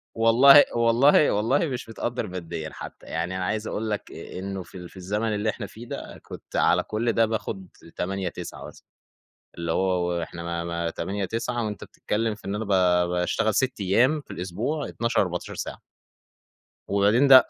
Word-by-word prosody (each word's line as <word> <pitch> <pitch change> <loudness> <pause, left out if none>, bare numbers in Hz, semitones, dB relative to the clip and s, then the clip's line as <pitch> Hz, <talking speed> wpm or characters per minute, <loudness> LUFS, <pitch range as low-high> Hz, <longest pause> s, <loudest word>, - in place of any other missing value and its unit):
والله 125 +6 +8
والله 120 +6 +5
والله 115 +10 +2
مش 125 -4 -5
متقدّر 120 0 -3
ماديًا 85 -3 -5
حتى، - - -9
يعني 85 +3 -3
أنا 90 - -2
عايز 105 +2 -2
أقول 110 0 -3
لك 105 - -3
إنه 95 0 -6
في 90 - -12
ال 90 -1 -9
في - - -16
الزمن 105 +4 -1
اللي 105 +2 0
إحنا - - -4
فيه 115 +2 -11
ده - - -7
كنت - - -10
على - - +4
كل 115 +2 0
ده 115 - +4
باخد 105 -4 -4 0.3
8، 95 0 -2
9 - - -8
مثلًا، - - -15 0.7
اللي 85 -1 -2
هو 90 -1 +1
وإحنا 85 0 -4
ما 85 0 -3
ما 85 0 -2
8، 95 +4 -3
9 115 +3 -2
وأنتَ 105 -1 -5
بتتكلم 110 0 -2
في 105 - -17
إن 100 - -2
أنا 110 +1 -3
ب - - -10 0.4
باشتغل 90 +5 +1
6 130 -3 +1
أيام 125 +11 +3
في - - -13
الأسبوع 105 - -3
12 115 0 +1
14 90 -2 -3
ساعة. - - -5 1.1
وبعدين 105 +7 +4
ده 130 -1 +9
105 Hz, 180 wpm, -25 LUFS, 90-115 Hz, 1.1 s, ده